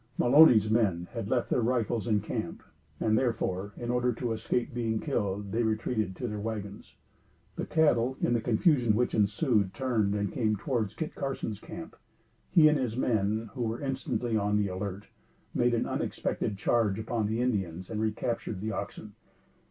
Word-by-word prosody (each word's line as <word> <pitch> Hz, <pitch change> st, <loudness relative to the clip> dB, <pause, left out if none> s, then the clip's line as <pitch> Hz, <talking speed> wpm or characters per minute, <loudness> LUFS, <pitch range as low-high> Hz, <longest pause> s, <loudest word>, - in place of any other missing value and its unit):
Mulony's 120 Hz, -5 st, +7 dB
men 95 Hz, -7 st, +1 dB
had 115 Hz, -4 st, -5 dB
left 125 Hz, -1 st, 0 dB
their 125 Hz, -, +3 dB
rifles 120 Hz, -1 st, 0 dB
in 105 Hz, -3 st, +2 dB
camp, -, -, -4 dB, 0.4 s
and 110 Hz, -1 st, +2 dB
therefore, 105 Hz, -5 st, -1 dB
in 120 Hz, 0 st, -3 dB
order 125 Hz, 0 st, +2 dB
to 120 Hz, 0 st, -3 dB
escape 115 Hz, +2 st, -1 dB
being 115 Hz, -2 st, -1 dB
killed, 100 Hz, -8 st, -2 dB
they 115 Hz, -, +1 dB
retreated 110 Hz, -3 st, -1 dB
to 125 Hz, -, -4 dB
their 105 Hz, -2 st, -4 dB
wagons. 105 Hz, -2 st, -6 dB, 0.6 s
The -, -, -4 dB
cattle, 130 Hz, -5 st, +2 dB
in 120 Hz, -, +1 dB
the 115 Hz, -, +1 dB
confusion 120 Hz, 0 st, +3 dB
which 125 Hz, +2 st, +1 dB
ensued, 105 Hz, -, +1 dB
turned 110 Hz, -6 st, 0 dB
and 100 Hz, -2 st, -1 dB
came 110 Hz, -3 st, +1 dB
towards 110 Hz, -1 st, -2 dB
Kit 160 Hz, -, -4 dB
Carson's 135 Hz, -6 st, -4 dB
camp. -, -, -9 dB, 0.5 s
He 155 Hz, -2 st, +6 dB
and 150 Hz, -1 st, +3 dB
his 120 Hz, -3 st, -2 dB
men, 110 Hz, -3 st, 0 dB
who 125 Hz, -, -5 dB
were 115 Hz, 0 st, -1 dB
instantly 130 Hz, -4 st, -2 dB
on 105 Hz, 0 st, +1 dB
the 100 Hz, -1 st, +1 dB
alert, 95 Hz, +2 st, -5 dB, 0.5 s
made 120 Hz, 0 st, +2 dB
an 115 Hz, -, 0 dB
unexpected 100 Hz, -, -2 dB
charge 105 Hz, -1 st, +1 dB
upon 110 Hz, -1 st, -1 dB
the 110 Hz, +2 st, -1 dB
Indians 95 Hz, -7 st, -2 dB
and 110 Hz, -1 st, -2 dB
recaptured 110 Hz, -2 st, -2 dB
the 110 Hz, +3 st, -3 dB
oxen. 105 Hz, 0 st, -6 dB
110 Hz, 170 wpm, -29 LUFS, 105-120 Hz, 0.6 s, Mulony's